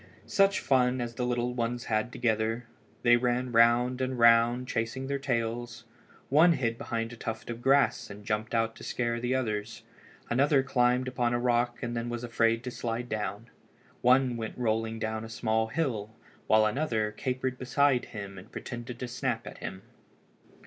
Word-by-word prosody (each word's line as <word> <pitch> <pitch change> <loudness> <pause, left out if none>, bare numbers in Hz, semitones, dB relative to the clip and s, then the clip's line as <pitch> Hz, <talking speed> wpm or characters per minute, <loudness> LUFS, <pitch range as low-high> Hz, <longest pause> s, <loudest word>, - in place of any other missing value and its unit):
Such 195 0 +3
fun 130 -1 +2
as 120 -1 -3
the 125 - -5
five 125 - 0
little 120 0 -1
ones 120 0 -2
had 110 +2 0
together! 115 0 0 0.4
They 120 0 +6
ran 125 +1 0
round 120 +2 +4
and 130 0 -1
round, 120 +1 +5
chasing 115 +2 -2
their 140 +1 -2
tails. 120 -3 -2 0.5
One 160 +5 +6
hid 115 -7 -1
behind 115 0 -3
a - - -8
tuft 110 0 -5
of 120 0 -7
grass 135 +2 +3
and 100 +1 -10
jumped 110 +2 -2
out 115 0 +1
to - - -11
scare 120 -1 -1
the 125 +2 0
others. 110 -2 -3 0.4
Another 135 +3 +3
climbed 125 -1 +2
upon 120 -1 0
a - - 0
rock 120 0 0
and 120 0 -3
then 115 0 -2
was 120 0 -4
afraid 115 -1 +1
to 125 - -4
slide 120 +1 -4
down. 105 +1 -4 0.5
One 125 0 +4
went 110 -1 -5
rolling 115 -1 -1
down 110 0 -3
a 110 - -8
small 110 -1 0
hill 115 -6 -2 0.4
while 110 0 +5
another 110 -3 0
capered 130 +2 -3
beside 130 0 +2
him 100 -3 -8
and 100 +5 -15
pretended 120 -1 -7
to 125 - -5
snap 120 -1 -2
at - - -9
him. 95 +1 -7
120 Hz, 175 wpm, -29 LUFS, 115-125 Hz, 0.5 s, They